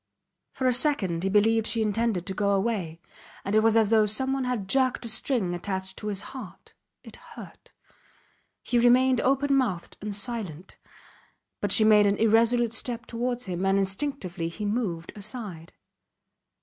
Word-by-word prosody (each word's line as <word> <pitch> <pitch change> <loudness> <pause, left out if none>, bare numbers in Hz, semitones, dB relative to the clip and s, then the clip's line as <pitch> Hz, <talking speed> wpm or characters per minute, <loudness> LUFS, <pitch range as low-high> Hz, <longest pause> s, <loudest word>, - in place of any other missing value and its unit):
For 260 - -4
a 255 - +3
second 240 - +2
he 195 - -1
believed 220 +2 +2
she 225 -1 +1
intended 215 -3 -1
to 190 - -4
go 200 +1 0
away, 190 -6 -2 0.5
and 195 - -3
it 215 - +4
was 225 0 +3
as 220 -1 +2
though 215 -1 +4
someone 265 +5 0
had 240 -6 -3
jerked 255 +2 +1
a - - -3
string 225 -4 0
attached 190 +1 -4
to 210 - -6
his 200 -2 -2
heart. 250 -8 -11 0.3
It - - -13
hurt. - - -14 0.9
He 240 - +1
remained 250 +1 +4
open 275 +2 +1
mouthed 215 -11 -2
and 205 0 -4
silent. 200 -7 -5 0.8
But - - -2
she 220 - +6
made 210 -1 +5
an 200 0 +1
irresolute 230 +1 +3
step 235 +1 -4
towards 245 +1 -3
him, 180 -1 -4
and 195 0 +2
instinctively 195 -4 -2
he 210 +5 -6
moved 205 -7 -3
aside. 200 -6 -4
215 Hz, 160 wpm, -26 LUFS, 195-245 Hz, 0.9 s, she